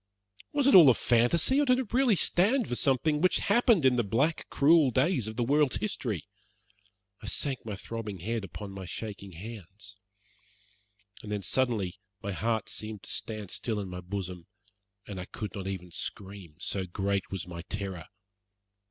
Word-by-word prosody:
Was 285 -2 +1
it 275 - +5
all 170 -7 +10
a 125 - +5
fantasy, 145 - +3
or - - +2
did 250 0 +5
it 255 -4 -4
really 250 -4 +4
stand 215 +8 +2
for - - -3
something 140 +4 +2
which 185 - +4
had 200 - +1
happened 235 - +4
in 125 -1 +5
the 120 - +3
black, 130 +10 0
cruel 150 0 +5
days 130 - +1
of 110 - -6
the 120 - 0
world's 145 +2 +3
history? 120 - -3 0.9
I 105 - -8
sank 135 +3 -1
my 105 - -3
throbbing 110 0 -6
head 110 +5 -3
upon 100 +1 -7
my 95 -2 -7
shaking 100 -2 -6
hands. 100 +1 -9 1.3
And 105 - -8
then, 105 -1 -2
suddenly, 105 -5 0 0.2
my 100 - -4
heart 110 +2 -1
seemed 110 -2 -6
to - - -10
stand 105 -4 -5
still 110 -3 -2
in 100 -2 -5
my 90 0 -6
bosom, 90 -2 -5 0.6
and 100 -3 -6
I 90 - -5
could 105 0 -6
not 95 -2 -5
even 90 -2 -5
scream, 95 -3 -5
so 95 +1 -2
great 100 +1 -1
was 95 -3 -4
my 85 -1 -7
terror. 95 -5 -4
110 Hz, 180 wpm, -29 LUFS, 95-140 Hz, 1.3 s, all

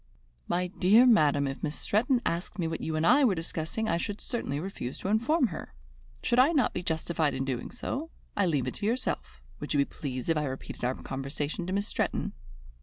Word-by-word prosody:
"My 180 +1 +1
dear 195 +6 +5
madam, 150 - +5
if 135 0 -5
Miss 150 - -2
Stretton 245 +4 +1
asked 170 +4 -2
me 170 -4 0
what 160 - -3
you 160 - -2
and 155 +1 +1
I 280 +11 +6
were 220 -8 +4
discussing, 165 +6 -3
I 170 - +2
should 205 +4 -3
certainly 185 - -2
refuse 160 -8 -5
to 190 - -4
inform 240 +6 +3
her. - - -8 0.5
Should 240 - +3
I 280 +6 +6
not 280 -5 +2
be 180 - -2
justified 160 -3 0
in 135 0 -1
doing 130 -3 -3
so? 280 +5 -4 0.3
I 200 -2 +2
leave 145 -6 +1
it - - -3
to 205 - -5
yourself. 225 - -2 0.2
Would - - -3
you - - +4
be 140 - +4
pleased 130 -4 -5
if 165 - +2
I 150 - 0
repeated 135 -2 -6
our 125 +1 +1
conversation 145 +5 -4
to 185 - -2
Miss 200 +1 0
Stretton?" - - -1
170 Hz, 215 wpm, -29 LUFS, 145-220 Hz, 0.5 s, I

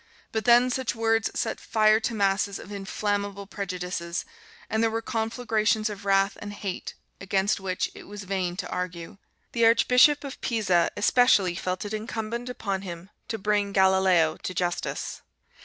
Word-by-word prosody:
But 220 0 -2
then 245 +1 +6
such 255 -1 -1
words 225 0 +1
set - - -2
fire 215 0 +3
to 225 +1 -2
masses 200 -1 +1
of 195 - -11
inflammable 200 0 -3
prejudices, 180 -3 -4 0.4
and 220 +1 0
there 225 - +3
were 225 +1 -1
conflagrations 220 -2 0
of 200 0 -9
wrath 195 +1 +3
and 205 0 -6
hate 195 -3 -5 0.2
against 195 +1 0
which 190 -1 -2
it - - -12
was 205 0 -8
vain 185 -2 -2
to - - -4
argue. 180 +2 -5 0.3
The 235 -1 +4
Archbishop 250 +5 +5
of 275 -2 -8
Pisa 195 -7 +2
especially 205 -4 +4
felt 185 +2 -3
it 205 - -5
incumbent 225 +2 -4
upon 200 -6 -3
him 180 0 -8 0.2
"to 225 - -3
bring 205 -1 0
Galileo 190 -4 +4
to 185 - -5
justice." 175 0 -2
205 Hz, 155 wpm, -26 LUFS, 190-225 Hz, 0.4 s, then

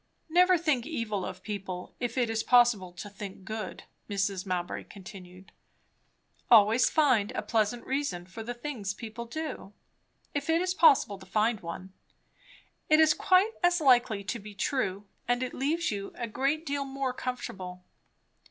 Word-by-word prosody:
"Never 360 +2 +5
think 305 -7 0
evil 230 - -2
of - - -7
people, 190 -4 -6
if 245 0 -3
it 245 -2 +2
is 225 0 -1
possible 235 -7 +4
to 180 +4 -8
think 195 -1 -9
good," 215 -2 -5 0.3
Mrs. 195 -1 -1
Mowbray 180 -1 -3
continued. 185 -1 -12 1.0
"Always 225 +1 +6
find 250 -10 +3
a - - -3
pleasant 225 +1 0
reason 265 -11 -2
for 185 +5 -9
the 240 +2 -5
things 240 -7 -4
people 230 +1 -7
do, 260 -6 -6 0.6
if 285 +1 -3
it 325 +1 +4
is 365 0 0
possible 290 - +4
to 190 - -13
find 215 +3 +1
one. 185 +2 -8 1.0
It 310 0 +6
is 315 -1 +6
quite 375 +4 +3
as 350 0 +3
likely 245 -8 +4
to 235 +5 -3
be 210 0 -11
true, 205 -7 -1 0.2
and 245 +1 +1
it 255 - -4
leaves 305 +3 0
you 200 -1 -5
a 235 - -4
great 275 +8 -1
deal 285 -1 -1
more 270 -1 -3
comfortable." 185 -8 -6
230 Hz, 160 wpm, -29 LUFS, 195-280 Hz, 1.0 s, Always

